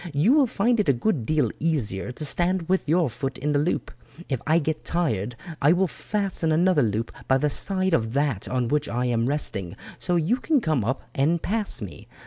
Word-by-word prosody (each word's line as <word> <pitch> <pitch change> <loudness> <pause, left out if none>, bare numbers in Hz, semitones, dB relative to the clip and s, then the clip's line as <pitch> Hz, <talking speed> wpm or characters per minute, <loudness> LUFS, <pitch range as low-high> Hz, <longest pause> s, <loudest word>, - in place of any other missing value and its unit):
You 175 - +4
will 290 -3 +5
find 230 +2 +1
it 205 - +2
a - - +6
good 130 - -1
deal 155 -1 +2
easier 125 - -1
to 150 +5 -4
stand 175 +3 0
with 185 -5 0
your 170 0 +3
foot 130 +2 -4
in 150 +3 -1
the 145 - +2
loop. 155 +5 -1 0.4
If 130 -4 -1
I 160 +1 +4
get 160 -1 -1
tired 120 - -1 0.3
I 145 +4 +5
will 185 +2 +2
fasten 190 -2 -2
another 170 0 +3
loop 110 0 -1 0.2
by 130 - +4
the 150 +2 0
side 190 +1 0
of 115 -7 +1
that 140 -7 0
on 125 -2 0
which 150 +2 0
I 125 +1 -1
am 120 -1 +1
resting, 100 - -2 0.2
so 180 - 0
you 175 +9 +2
can 290 +3 +2
come 155 - 0
up 130 +6 -2
and 155 +5 +2
pass 210 +4 -1
me. - - -9
150 Hz, 210 wpm, -25 LUFS, 125-180 Hz, 0.4 s, a